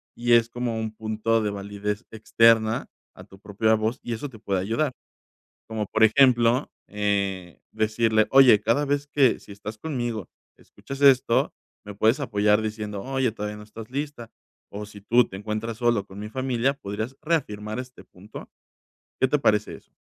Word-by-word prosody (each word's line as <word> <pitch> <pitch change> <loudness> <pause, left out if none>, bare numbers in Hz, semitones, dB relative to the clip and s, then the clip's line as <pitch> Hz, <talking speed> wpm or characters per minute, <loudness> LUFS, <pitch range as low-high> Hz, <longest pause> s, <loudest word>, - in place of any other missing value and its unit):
y 120 0 +1
es 115 0 +5
como 120 -2 -3
un 110 -1 -3
punto 110 +1 0
de 105 - 0
validez 100 +2 -4
externa 110 0 +3 0.3
a - - -12
tu 95 - -17
propia 110 +2 0
voz 110 +3 -1
y 120 - -4
eso 130 +6 -5
te 115 - -13
puede 100 -3 -2
ayudar, 115 +9 -1 0.8
como, 110 -1 -3
por 110 - +1
ejemplo, 120 +1 +4 0.2
eh, 100 -4 -2
decirle: 110 0 +1
"Oye, 130 -6 +7
cada 120 +7 +1
vez 145 0 -1
que, 140 -4 +3
si - - -14
estás 105 +2 -8
conmigo, 120 - -4 0.3
escuchas 135 0 -10
esto, 130 -4 +4 0.3
me 105 - -8
puedes 110 +6 +2
apoyar", 105 -3 +2
diciendo: 105 -2 -4
"Oye, 130 0 -1
todavía 105 -1 -5
no 105 - -10
estás 110 +1 -11
lista", 140 -4 -5 0.4
o 105 +1 -7
si 105 0 -13
tú 120 +4 +3
te 95 - -10
encuentras 110 +2 -4
solo 120 -4 +1
con 95 -1 -13
mi 105 +1 -6
familia, 130 +1 0
podrías 110 +2 -5
reafirmar 110 -10 -2
este 125 0 -10
punto, 100 +4 -12 0.7
¿qué - - +5
te 150 +3 +1
parece 105 -4 +1
eso? - - -21
110 Hz, 170 wpm, -25 LUFS, 105-125 Hz, 0.8 s, Oye